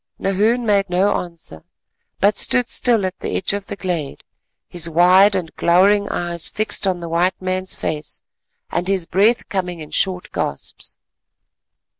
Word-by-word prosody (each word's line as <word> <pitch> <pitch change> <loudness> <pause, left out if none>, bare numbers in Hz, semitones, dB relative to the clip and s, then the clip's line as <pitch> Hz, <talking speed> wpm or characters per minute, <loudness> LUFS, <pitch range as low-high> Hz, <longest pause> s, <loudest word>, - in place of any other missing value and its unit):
Nahoon 215 +5 +1
made 200 -3 +2
no 190 +3 +2
answer, 165 - -9 0.6
but 205 +1 +3
stood 250 +3 +2
still 230 -4 +2
at 185 0 -5
the - - -4
edge 190 - -1
of 200 -1 -4
the - - -5
glade, 175 -8 -4 0.4
his 170 -1 -3
wild 185 +5 +5
and 175 -4 -4
glowering 200 +4 +3
eyes 170 -1 -3
fixed 215 -1 -1
on 180 -2 -1
the 170 - -5
white 170 +3 0
man's 185 0 -2
face 150 -1 -5 0.5
and 175 +1 -2
his 190 -3 0
breath 205 +8 +2
coming 180 -3 -3
in 155 -1 -9
short 185 -2 +1
gasps. - - -4
185 Hz, 155 wpm, -19 LUFS, 175-200 Hz, 0.6 s, wild